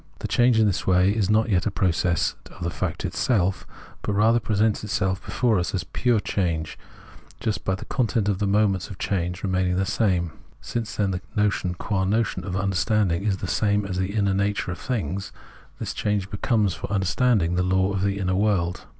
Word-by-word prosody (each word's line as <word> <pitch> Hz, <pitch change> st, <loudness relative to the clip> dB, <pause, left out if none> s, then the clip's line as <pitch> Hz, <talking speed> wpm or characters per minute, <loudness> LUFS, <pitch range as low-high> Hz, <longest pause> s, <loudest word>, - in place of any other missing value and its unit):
The -, -, -4 dB
change 120 Hz, 0 st, +3 dB
is 110 Hz, -, +4 dB
in -, -, +5 dB
this 100 Hz, -, -1 dB
way 95 Hz, +2 st, +4 dB
not 110 Hz, +1 st, +3 dB
yet 95 Hz, +1 st, +2 dB
a -, -, +2 dB
process 90 Hz, -3 st, +1 dB, 0.2 s
of 90 Hz, -, -10 dB
the 85 Hz, -, -1 dB
fact -, -, -3 dB
itself, 95 Hz, -6 st, 0 dB, 0.3 s
but 105 Hz, -, -2 dB
rather 110 Hz, +4 st, +4 dB
presents 110 Hz, 0 st, +1 dB
itself 95 Hz, -2 st, -1 dB
before 115 Hz, -6 st, +1 dB
us 90 Hz, -, -2 dB
as 90 Hz, -, -1 dB
pure 120 Hz, -3 st, +1 dB
change, 85 Hz, -6 st, -2 dB, 0.6 s
just 105 Hz, -1 st, -2 dB
by 95 Hz, -, 0 dB
the 95 Hz, -, -9 dB
content 115 Hz, -5 st, 0 dB
of 100 Hz, -2 st, 0 dB
the 105 Hz, -, +1 dB
moments 100 Hz, -2 st, +2 dB
of 95 Hz, -, -8 dB
change 90 Hz, 0 st, -2 dB
remaining 95 Hz, -2 st, +1 dB
the 95 Hz, +1 st, +1 dB
same. 95 Hz, -5 st, +1 dB, 0.3 s
Since, 115 Hz, -1 st, -4 dB
however, 95 Hz, -3 st, 0 dB
the 105 Hz, -, +2 dB
notion 95 Hz, -3 st, 0 dB
qua 95 Hz, +1 st, -1 dB
notion 110 Hz, +4 st, 0 dB
of 90 Hz, -2 st, -3 dB
understanding 100 Hz, -1 st, +1 dB
is 100 Hz, -3 st, +1 dB
the 95 Hz, -, -5 dB
same 105 Hz, +2 st, +1 dB
as 95 Hz, -2 st, -3 dB
the 95 Hz, +3 st, -2 dB
inner 100 Hz, -2 st, +2 dB
nature 100 Hz, -1 st, 0 dB
of 90 Hz, -, -6 dB
things, 100 Hz, -, -3 dB, 0.5 s
this -, -, -4 dB
change 105 Hz, -2 st, -1 dB
becomes 105 Hz, -1 st, +1 dB
for -, -, -6 dB
understanding 100 Hz, -1 st, +2 dB
the 90 Hz, -, +1 dB
law 95 Hz, +1 st, +1 dB
of 95 Hz, -, -1 dB
the 100 Hz, 0 st, 0 dB
inner 95 Hz, -2 st, 0 dB
world. 95 Hz, -3 st, 0 dB
100 Hz, 200 wpm, -24 LUFS, 90-105 Hz, 0.6 s, in